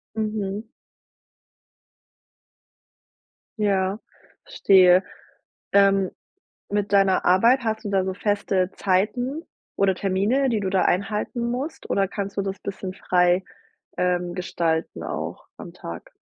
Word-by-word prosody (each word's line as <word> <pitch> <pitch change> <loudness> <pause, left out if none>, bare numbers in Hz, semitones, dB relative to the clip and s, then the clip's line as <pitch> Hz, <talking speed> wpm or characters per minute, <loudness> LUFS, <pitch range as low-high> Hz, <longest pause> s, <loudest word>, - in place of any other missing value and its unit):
Mhm. 215 -1 -3 2.9
Ja, 195 -1 +1 0.5
verstehe. 190 - +5 0.7
Dann, 195 -1 +4 0.6
mit 205 0 -1
deiner 195 -1 +3
Arbeit 230 +9 +5
hast 220 -1 -2
du 205 - -3
da 190 -1 +2
so 190 0 -3
feste 200 -2 0
Zeiten 235 - 0 0.3
oder 195 -1 +2
Termine, 205 +9 +1
die 220 -3 0
du 190 -1 -2
da 190 -1 +2
einhalten 210 +5 -1
musst, 265 +6 -5
oder 195 -1 +2
kannst 200 0 -5
du 200 - 0
das 195 0 -4
bisschen 190 -1 -6
frei, 180 0 +2 0.6
ähm, 180 -1 0
gestalten 165 -3 -2
auch - - -5
am - - -10
Tag? 85 0 -9
195 Hz, 115 wpm, -24 LUFS, 185-210 Hz, 2.9 s, verstehe